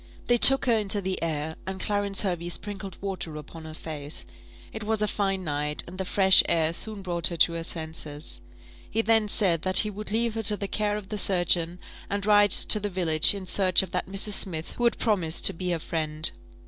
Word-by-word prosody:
They 240 - +2
took 270 +3 +8
her 240 - +2
into 210 -2 -1
the 190 -1 -5
air, 160 -1 -4
and 190 0 -6
Clarence 205 0 -2
Hervey 175 -3 -3
sprinkled 195 0 -7
water 190 -5 -6
upon 160 +2 -11
her 155 0 -10
face. 150 -2 -9 0.5
It 220 - -7
was 215 0 -1
a - - 0
fine 195 -2 -2
night, 150 -1 -3
and 185 +2 -11
the 190 - -3
fresh 190 0 +5
air 165 -1 0
soon 210 +2 +1
brought 175 -2 0
her 170 - -6
to 170 - +3
her 165 0 -5
senses. 160 -2 -5 0.5
He 225 - -1
then 225 -1 +1
said 185 -6 +1
that 185 0 +3
he 210 - -4
would 210 +1 -9
leave 230 +1 -1
her 225 - -4
to 210 -1 +2
the 200 - -5
care 210 0 -2
of 205 -2 -10
the 210 - -3
surgeon, 175 -2 +1 0.3
and 200 -1 -3
ride 205 -1 +4
to 210 - +5
the 205 0 -4
village 170 -2 +3
in 195 -2 -7
search 185 -1 +2
of 190 - -9
that 180 - -3
Mrs. 200 +2 -2
Smith 165 -5 -2
who 240 - -3
had 235 - +1
promised 185 -8 -1
to - - +7
be 180 +2 -5
her 175 - -1
friend. 155 -1 -2
190 Hz, 220 wpm, -25 LUFS, 165-205 Hz, 0.5 s, took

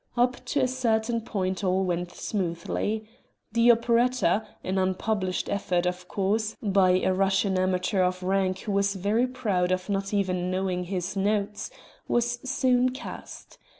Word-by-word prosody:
Up 245 +1 +1
to 285 - 0
a 255 - +3
certain 230 -2 0
point 190 -4 -2
all 190 0 +2
went 175 -1 -1
smoothly. 205 +3 -2 0.4
The 230 +2 +6
operetta 235 -3 +2 0.2
an 190 +1 -1
unpublished 185 0 -1
effort 180 -3 0
of 180 0 -3
course 210 +3 0
by 190 -3 +3
a 190 - +2
Russian 195 +1 +2
amateur 185 +1 +1
of 180 0 0
rank 190 0 0
who 210 - -4
was 200 0 +1
very 210 +6 +1
proud 205 -8 0
of 185 +2 -1
not 195 0 -1
even 185 -3 0
knowing 185 -1 -1
his 185 +1 -3
notes, 205 +1 -1 0.4
was 240 0 +1
soon 255 -1 +3
cast. 260 +1 -9
195 Hz, 150 wpm, -27 LUFS, 185-225 Hz, 0.4 s, The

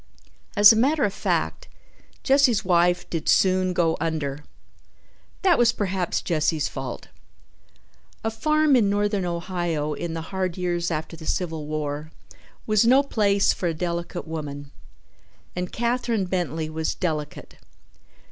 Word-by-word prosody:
As 205 +1 +9
a - - 0
matter 275 +6 +2
of 200 - +1
fact, - - -2 0.6
Jesse's 265 -6 +3
wife 175 0 +2
did 165 -2 -2
soon 185 -1 +3
go 170 -2 +1
under. 150 -3 -2 1.0
That 360 -6 +4
was 235 -1 +5
perhaps 190 -5 -2
Jesse's 155 -2 0
fault. - - -7 1.1
A 225 - -1
farm 305 +5 +2
in 220 -5 +3
Northern 205 -1 0
Ohio 170 -3 -2
in 165 +1 -4
the 165 - -3
hard 185 -2 -2
years 175 -1 -1
after 160 0 -4
the 160 -1 -10
Civil 160 -4 -2
War 150 0 -4 0.6
was 215 -1 +3
no 260 +4 +5
place 200 -7 +2
for 180 - -3
a 165 - -1
delicate 170 0 -4
woman, 145 -3 -6 0.8
and 180 0 -3
Katherine 235 -3 0
Bentley 170 -4 -2
was 160 0 -3
delicate. 155 -5 -4
180 Hz, 135 wpm, -24 LUFS, 160-210 Hz, 1.1 s, As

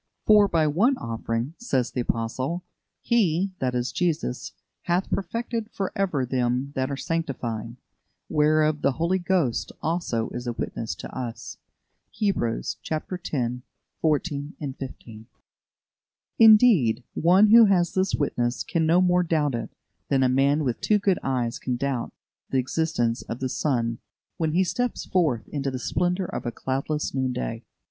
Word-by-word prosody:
"For 210 -1 +6
by 165 -4 +2
one 210 - +2
offering," 115 +3 -3
says 135 - 0
the 125 - -1
Apostle, 130 +9 -2 0.4
"He" 195 -5 +2
(that 125 -1 -1
is, 125 +1 -1
Jesus) 165 -7 -2 0.3
"hath 175 +2 0
perfected 230 +2 -2
for 195 -2 -3
ever 180 -10 0
them 125 +2 -1
that 130 0 -1
are 140 - -3
sanctified. 120 -9 -3 0.5
Whereof 155 0 +2
the 140 - +2
Holy 170 +6 0
Ghost 175 -9 0
also 160 -9 -1
is 120 0 -5
a 120 - -1
witness 115 -6 -4
to - - -9
us" 120 -2 -6 0.5
(Hebrews 195 - -1
x. 155 +3 -4 0.9
14, 150 -1 0
15). 130 -6 -8 1.1
Indeed, 210 - +6
one 185 +6 +5
who 230 +1 +9
has 180 -4 +2
this 190 0 +1
witness 120 -4 -1
can 160 -2 0
no 170 +3 +5
more 180 0 +3
doubt 155 -5 +1
it 115 - -3 0.4
than 135 -1 +3
a - - +4
man 140 +4 +3
with 125 -4 -2
two 210 - +3
good 195 -3 +1
eyes 125 -3 -1
can 125 - -2
doubt 130 -1 -2 0.4
the 135 - 0
existence 130 -3 0
of 115 - -6
the 130 - -2
sun 115 -5 -1 0.4
when 160 -2 0
he 185 +3 +4
steps 245 +6 -2
forth 155 -11 +1
into 140 -2 -2
the 130 - -4
splendour 180 - 0
of 130 - -5
a - - -1
cloudless 135 +5 -2
noon 130 -1 0
day. - - -4
145 Hz, 150 wpm, -25 LUFS, 125-180 Hz, 1.1 s, who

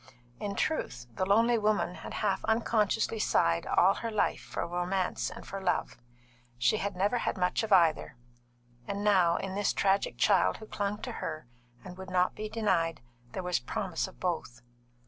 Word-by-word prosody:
In 200 -1 -3
truth, 125 - -2
the 185 - -1
lonely 230 +3 +4
woman 210 -4 +1
had - - -8
half 195 -2 0
unconsciously 220 -1 +1
sighed 85 - +2
all 190 +2 +4
her 230 - -4
life 215 -2 0
for - - -4
romance 180 +2 -1
and - - -10
for 195 0 -6
love. 180 -2 0 0.6
She 125 - +3
had 200 -2 -3
never 205 +6 +1
had - - -2
much 180 -1 +1
of 220 - -4
either, 165 -8 +4 0.7
and 200 0 -3
now, 185 -5 +4
in 195 -1 -4
this 205 +1 +1
tragic 195 0 +1
child - - +3
who 220 - -10
clung 205 0 -3
to - - -4
her 155 -1 -5 0.4
and 180 0 -9
would 190 0 -7
not 180 0 +2
be 215 0 -5
denied, 170 - 0 0.3
there 190 - -4
was 180 0 0
promise 170 - -3
of 190 - -15
both. 145 -9 -3
195 Hz, 175 wpm, -30 LUFS, 180-210 Hz, 0.7 s, lonely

